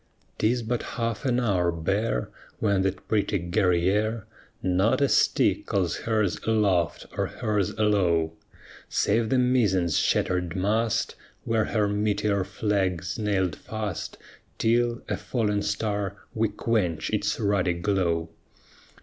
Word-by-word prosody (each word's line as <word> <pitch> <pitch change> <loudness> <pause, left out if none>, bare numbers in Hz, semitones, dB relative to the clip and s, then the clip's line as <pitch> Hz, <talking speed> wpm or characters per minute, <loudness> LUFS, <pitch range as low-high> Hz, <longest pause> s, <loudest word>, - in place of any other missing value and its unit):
'Tis 120 +2 +1
but 120 +2 -1 0.2
half 115 -1 -2
an 125 -2 +2
hour, 95 -7 +1
bare, 85 - -1 0.3
When 100 -3 +1
that 95 0 -2
pretty 105 -1 +1
Guerrière 95 +4 +1 0.4
Not 95 +7 +2
a 140 - +3
stick - - +2
calls 95 -4 0
hers 110 -4 0
aloft 105 -6 +1
or - - 0
hers 105 -3 -1
alow, 90 -7 +2 0.6
Save 110 +2 +1
the 130 - +2
mizzen's 105 -10 +2
shattered 90 -1 0
mast, 105 +4 0 0.3
Where 115 -1 +1
her 105 -2 +1
"meteor 105 -1 0
flag" 95 -3 -1
's 90 +4 -4
nailed 100 -4 0
fast 110 -4 -5 0.4
Till, 120 +1 +1
a - - -1
fallen 105 -4 -1
star, 100 -1 -2 0.2
we 110 0 +1
quench 95 -8 -1
its 105 +1 0
ruddy 100 -4 +1
glow. 85 -2 0
105 Hz, 125 wpm, -26 LUFS, 90-110 Hz, 0.6 s, a